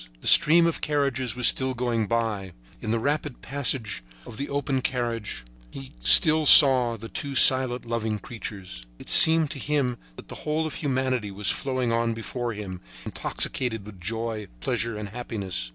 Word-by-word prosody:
The -, -, -7 dB
stream 165 Hz, +2 st, +6 dB
of 170 Hz, -, -3 dB
carriages 140 Hz, -5 st, -3 dB
was 125 Hz, -1 st, +3 dB
still 130 Hz, -1 st, +1 dB
going 120 Hz, -3 st, -3 dB
by. 110 Hz, -5 st, -4 dB, 0.3 s
In 110 Hz, -, -7 dB
the 115 Hz, -, -1 dB
rapid 145 Hz, +2 st, -4 dB
passage 130 Hz, -, -1 dB, 0.2 s
of 110 Hz, -, -12 dB
the 140 Hz, -, -6 dB
open 140 Hz, -2 st, -3 dB
carriage 120 Hz, -, -5 dB, 0.3 s
he 135 Hz, -, -12 dB
still 155 Hz, -3 st, +5 dB
saw 130 Hz, -6 st, +7 dB
the 115 Hz, +2 st, -10 dB
two 135 Hz, +7 st, -7 dB
silent, 130 Hz, -2 st, +6 dB
loving 110 Hz, -2 st, -4 dB
creatures. 95 Hz, -, -10 dB
It -, -, -11 dB
seemed 160 Hz, -2 st, +7 dB
to 135 Hz, -, -8 dB
him 135 Hz, -3 st, -3 dB, 0.2 s
that -, -, -14 dB
the -, -, -11 dB
whole 155 Hz, +1 st, -3 dB
of 155 Hz, -, -6 dB
humanity 130 Hz, -6 st, -3 dB
was 100 Hz, +1 st, -1 dB
flowing 130 Hz, -3 st, -3 dB
on 115 Hz, 0 st, -2 dB
before 120 Hz, +1 st, -6 dB
him, 95 Hz, -3 st, -9 dB, 0.2 s
intoxicated 115 Hz, -6 st, -4 dB
with 100 Hz, -4 st, -14 dB
joy, 110 Hz, +1 st, -6 dB
pleasure 115 Hz, -, -3 dB
and 105 Hz, -1 st, -8 dB
happiness. 100 Hz, -, -6 dB
120 Hz, 170 wpm, -23 LUFS, 110-135 Hz, 0.3 s, saw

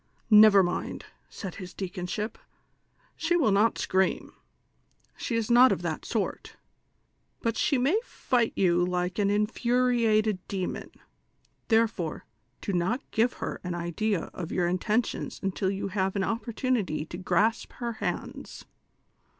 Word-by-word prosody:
"Xever 210 Hz, -3 st, +8 dB
mind," 175 Hz, -, -4 dB, 0.2 s
said 190 Hz, -4 st, -7 dB
his 180 Hz, 0 st, -9 dB
deaconship, 190 Hz, +3 st, -4 dB, 0.8 s
"she 335 Hz, +1 st, 0 dB
will 285 Hz, -11 st, +3 dB
not 210 Hz, +3 st, +3 dB
scream, 190 Hz, 0 st, 0 dB, 0.8 s
she 235 Hz, -, -3 dB
is 230 Hz, 0 st, 0 dB
not 250 Hz, +2 st, +7 dB
of -, -, -1 dB
that -, -, -3 dB
sort; -, -, -3 dB, 0.9 s
but 230 Hz, -1 st, 0 dB
she 285 Hz, -, +2 dB
may 280 Hz, -, +2 dB
fight 245 Hz, -, 0 dB
you 175 Hz, -2 st, +3 dB
like 180 Hz, +1 st, -1 dB
an 200 Hz, -1 st, +2 dB
infuriated 220 Hz, -1 st, +2 dB
demon; 190 Hz, -2 st, -4 dB, 0.8 s
therefoi 225 Hz, -8 st, +1 dB
e, -, -, -14 dB, 0.4 s
do 200 Hz, -, -3 dB
not 185 Hz, +10 st, -1 dB
give 230 Hz, +2 st, +2 dB
her -, -, -5 dB
an 180 Hz, -1 st, -3 dB
idea 175 Hz, +3 st, -2 dB
ot 175 Hz, -3 st, -6 dB
your 180 Hz, -2 st, 0 dB
intentions 210 Hz, +6 st, -1 dB
until 195 Hz, 0 st, 0 dB
you 195 Hz, 0 st, -3 dB
have 190 Hz, 0 st, -1 dB
an 195 Hz, -, +1 dB
opportunity 230 Hz, -, -1 dB
to 170 Hz, -, -8 dB
grasp 215 Hz, +4 st, +1 dB
her 235 Hz, -1 st, -4 dB
hands." -, -, -5 dB
210 Hz, 135 wpm, -28 LUFS, 185-230 Hz, 0.9 s, Xever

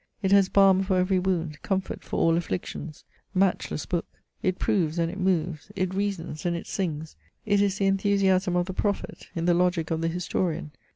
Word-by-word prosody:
It 190 Hz, -, +1 dB
has 200 Hz, -1 st, +5 dB
balm 195 Hz, -1 st, +5 dB
for 190 Hz, -1 st, +1 dB
every 185 Hz, +1 st, +2 dB
wound, 170 Hz, -5 st, -1 dB
comfort 190 Hz, -1 st, -2 dB
for -, -, -4 dB
all 165 Hz, 0 st, +4 dB
afflictions. 155 Hz, -, -4 dB, 0.3 s
Matchless 185 Hz, -5 st, +1 dB
book! 175 Hz, -2 st, -2 dB, 0.3 s
it 185 Hz, -1 st, 0 dB
proves 170 Hz, -5 st, +1 dB
and 165 Hz, 0 st, +1 dB
it 195 Hz, -, -7 dB
moves, 175 Hz, -5 st, -1 dB
it 185 Hz, 0 st, -1 dB
reasons 190 Hz, -6 st, -3 dB
and 175 Hz, -1 st, 0 dB
it -, -, -7 dB
sings; 160 Hz, -5 st, -3 dB, 0.3 s
it 205 Hz, -1 st, +3 dB
is 200 Hz, -1 st, +1 dB
the 200 Hz, -, +1 dB
enthusiasm 195 Hz, -2 st, +2 dB
of 175 Hz, 0 st, +2 dB
the 190 Hz, -, -5 dB
prophet, 200 Hz, +1 st, -2 dB
in 165 Hz, -1 st, -1 dB
the 175 Hz, -, +4 dB
logic 175 Hz, -2 st, +1 dB
of 160 Hz, 0 st, 0 dB
the 165 Hz, -, +1 dB
historian. 170 Hz, -2 st, -2 dB
185 Hz, 190 wpm, -26 LUFS, 165-195 Hz, 0.3 s, has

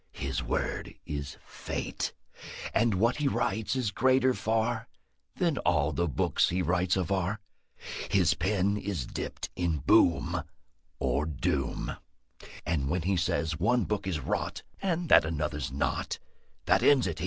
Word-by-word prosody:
His -, -, -3 dB
word -, -, -2 dB
is 70 Hz, -1 st, -5 dB
Fate, -, -, -4 dB, 0.6 s
And 115 Hz, -3 st, +3 dB
what 115 Hz, +6 st, +2 dB
he 145 Hz, -1 st, +1 dB
writes 110 Hz, -3 st, 0 dB
Is 125 Hz, -5 st, 0 dB
greater 130 Hz, +1 st, +3 dB
far 110 Hz, +3 st, 0 dB, 0.5 s
Than 170 Hz, -6 st, +1 dB
all 80 Hz, -4 st, +2 dB
the 85 Hz, +4 st, 0 dB
books 70 Hz, -, +2 dB
He 90 Hz, +1 st, 0 dB
writes 90 Hz, +2 st, +2 dB
of 90 Hz, -2 st, -1 dB
are. 95 Hz, +2 st, 0 dB, 0.7 s
His -, -, +4 dB
pen 100 Hz, 0 st, +1 dB
Is 95 Hz, -11 st, -3 dB
dipped -, -, -5 dB
in 85 Hz, -3 st, 0 dB
boom -, -, +4 dB, 0.6 s
Or 75 Hz, -, 0 dB
doom; 75 Hz, -5 st, -2 dB, 0.7 s
And 70 Hz, -5 st, 0 dB
when 90 Hz, +1 st, 0 dB
He 95 Hz, +2 st, +1 dB
says 80 Hz, -2 st, 0 dB
one 120 Hz, +6 st, +3 dB
book 105 Hz, -2 st, -2 dB
is 85 Hz, -5 st, -1 dB
rot, 70 Hz, -, -2 dB, 0.2 s
And 175 Hz, -3 st, 0 dB
that -, -, +8 dB
another's 75 Hz, -3 st, -2 dB
not, 70 Hz, -, -1 dB, 0.5 s
That -, -, +4 dB
ends 140 Hz, -4 st, +5 dB
it. 80 Hz, -, -3 dB
95 Hz, 145 wpm, -29 LUFS, 80-115 Hz, 0.7 s, that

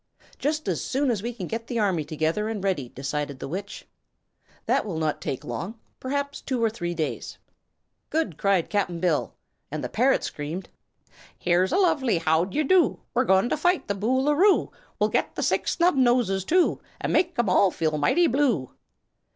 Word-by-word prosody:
"Just 305 Hz, +1 st, -1 dB
as -, -, -1 dB
soon 270 Hz, 0 st, 0 dB
as 215 Hz, -5 st, -1 dB
we 235 Hz, +3 st, -3 dB
can 220 Hz, -6 st, -6 dB
get 225 Hz, +5 st, -5 dB
the 240 Hz, -, -3 dB
army 190 Hz, -7 st, +1 dB
together 160 Hz, +8 st, -1 dB
and 210 Hz, -3 st, -4 dB
ready," 155 Hz, -11 st, -1 dB
decided 140 Hz, +2 st, -4 dB
the -, -, -6 dB
Witch. 195 Hz, +7 st, -6 dB, 0.8 s
"That -, -, +2 dB
will 190 Hz, -7 st, -4 dB
not 155 Hz, -1 st, -1 dB
take 130 Hz, -, -4 dB
long 145 Hz, -, -5 dB, 0.2 s
perhaps 280 Hz, +2 st, -3 dB
two 255 Hz, -4 st, -2 dB
or 225 Hz, -, +2 dB
three 175 Hz, -5 st, -4 dB
days." 155 Hz, -2 st, -4 dB, 0.7 s
"Good!" 315 Hz, -, -1 dB
cried 195 Hz, -1 st, +1 dB
Cap'n 185 Hz, -5 st, 0 dB
Bill, 165 Hz, -4 st, 0 dB, 0.3 s
and -, -, -4 dB
the -, -, -3 dB
parrot -, -, +2 dB
screamed: 155 Hz, +6 st, -5 dB, 0.7 s
"Here's 180 Hz, +3 st, +2 dB
a 350 Hz, -, +2 dB
lovely 305 Hz, -, +2 dB
how 160 Hz, +1 st, +2 dB
d'y' 200 Hz, +11 st, -1 dB
do 350 Hz, +2 st, +3 dB
We're 255 Hz, +2 st, +2 dB
going 190 Hz, +3 st, +3 dB
to -, -, 0 dB
fight 355 Hz, +3 st, +1 dB
the 200 Hz, -, 0 dB
Boo 230 Hz, +7 st, +1 dB
loo 295 Hz, +2 st, +2 dB
roo! 385 Hz, +7 st, +3 dB, 0.3 s
We'll -, -, +2 dB
get -, -, 0 dB
the -, -, -2 dB
Six -, -, +1 dB
Snubnoses, 245 Hz, -, +3 dB
too, 360 Hz, +1 st, +3 dB, 0.2 s
And -, -, -2 dB
make'em 335 Hz, -, +2 dB
all 185 Hz, +1 st, +4 dB
feel 155 Hz, -3 st, -1 dB
mighty 340 Hz, -, +3 dB
blue." 245 Hz, -, +1 dB
205 Hz, 185 wpm, -25 LUFS, 170-270 Hz, 0.8 s, all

